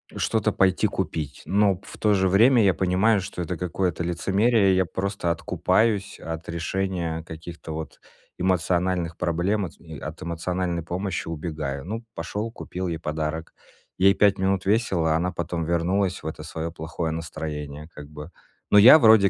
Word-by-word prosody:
что-то 110 Hz, -2 st, 0 dB
пойти 95 Hz, -1 st, +3 dB
купить. 75 Hz, -3 st, -4 dB
Но 100 Hz, 0 st, +3 dB
пф 95 Hz, -, -12 dB
в -, -, -16 dB
то 105 Hz, -1 st, +3 dB
же 95 Hz, -2 st, +2 dB
время 115 Hz, +5 st, +5 dB
я 95 Hz, -2 st, +4 dB
понимаю, 95 Hz, +4 st, +2 dB
что 95 Hz, -1 st, -5 dB
это 90 Hz, 0 st, -3 dB
какое-то 90 Hz, -1 st, -1 dB
лицемерие, 100 Hz, +4 st, +2 dB
и -, -, +3 dB
я 95 Hz, -, +3 dB
просто 95 Hz, 0 st, -2 dB
откупаюсь 90 Hz, +5 st, +1 dB
от 80 Hz, 0 st, -6 dB
решения 85 Hz, -1 st, -2 dB
каких-то 80 Hz, -1 st, -8 dB
вот 80 Hz, 0 st, -7 dB, 0.4 s
эмоциональных 90 Hz, -1 st, 0 dB
проблем, 90 Hz, +4 st, 0 dB
от 85 Hz, -, -11 dB
ми 80 Hz, -3 st, -10 dB
от 75 Hz, +1 st, -7 dB
эмоциональной 85 Hz, +1 st, -2 dB
помощи 95 Hz, +2 st, -3 dB
убегаю. 75 Hz, -3 st, -4 dB
Ну, 115 Hz, +4 st, -4 dB
пошёл, 110 Hz, +2 st, -4 dB
купил 90 Hz, -4 st, -5 dB
ей 85 Hz, -, -2 dB
подарок. 80 Hz, +1 st, -3 dB, 0.5 s
Ей 95 Hz, +1 st, +6 dB
5 100 Hz, -1 st, +4 dB
минут 95 Hz, 0 st, +1 dB
весело, 95 Hz, -7 st, +2 dB
а 80 Hz, -, +3 dB
она 90 Hz, +2 st, -1 dB
потом 85 Hz, 0 st, -3 dB
вернулась 90 Hz, +3 st, 0 dB
в -, -, -13 dB
это 80 Hz, -, -6 dB
своё 80 Hz, +1 st, -5 dB
плохое 80 Hz, 0 st, -4 dB
настроение 75 Hz, -2 st, -5 dB
как 75 Hz, -1 st, -10 dB
бы. 75 Hz, +3 st, -9 dB, 0.4 s
Но 105 Hz, -, +7 dB
я 125 Hz, +8 st, +10 dB
вроде 110 Hz, -5 st, +7 dB
90 Hz, 170 wpm, -25 LUFS, 80-95 Hz, 0.5 s, я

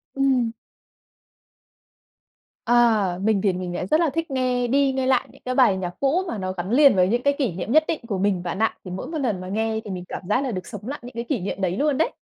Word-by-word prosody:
Ừm. 260 Hz, -4 st, +2 dB, 2.2 s
Ờ, 220 Hz, -6 st, +3 dB
mình 215 Hz, -2 st, +2 dB
thì 195 Hz, -2 st, +2 dB
mình 180 Hz, -1 st, -4 dB
lại 180 Hz, -, -3 dB
rất 310 Hz, -, +3 dB
là 335 Hz, -2 st, +3 dB
thích 330 Hz, +2 st, -3 dB
nghe 250 Hz, -2 st, 0 dB
đi 275 Hz, +2 st, +3 dB
nghe 265 Hz, -1 st, -1 dB
lại 260 Hz, -2 st, +2 dB
những -, -, -20 dB
cái 255 Hz, 0 st, -2 dB
bài 240 Hz, -8 st, +4 dB
nhạc 180 Hz, -2 st, -3 dB
cũ, 290 Hz, +7 st, +2 dB
mà 230 Hz, -, -3 dB
nó 185 Hz, -1 st, -3 dB
gắn 185 Hz, +3 st, -5 dB
liền 275 Hz, -3 st, +6 dB
với 180 Hz, -1 st, +4 dB
những 240 Hz, +5 st, +1 dB
cái 280 Hz, -, +3 dB
kỷ 260 Hz, -8 st, 0 dB
niệm 185 Hz, +6 st, -4 dB
nhất 310 Hz, +2 st, +5 dB
định 315 Hz, -, -1 dB
của 205 Hz, -4 st, -2 dB
mình 190 Hz, -2 st, 0 dB
bạn 175 Hz, +2 st, -4 dB
ạ. 225 Hz, -, +1 dB
Thì 180 Hz, -, -7 dB
mỗi 190 Hz, +8 st, -5 dB
một 320 Hz, +2 st, -4 dB
lần 225 Hz, -10 st, -1 dB
mà 185 Hz, -, -7 dB
nghe, 220 Hz, +3 st, -1 dB
thì 205 Hz, -, -6 dB
mình 180 Hz, -1 st, -5 dB
cảm -, -, -5 dB
giác 250 Hz, +6 st, +2 dB
là 265 Hz, -, -2 dB
được 185 Hz, -3 st, -5 dB
sống 210 Hz, -1 st, -8 dB
lại 285 Hz, +3 st, -4 dB
những 245 Hz, -, -9 dB
cái 235 Hz, 0 st, -4 dB
kỷ 250 Hz, 0 st, -2 dB
niệm 195 Hz, +1 st, -4 dB
đấy 185 Hz, +1 st, 0 dB
luôn 290 Hz, -1 st, +1 dB
đấy. 320 Hz, -, +1 dB
230 Hz, 265 wpm, -23 LUFS, 190-270 Hz, 2.2 s, liền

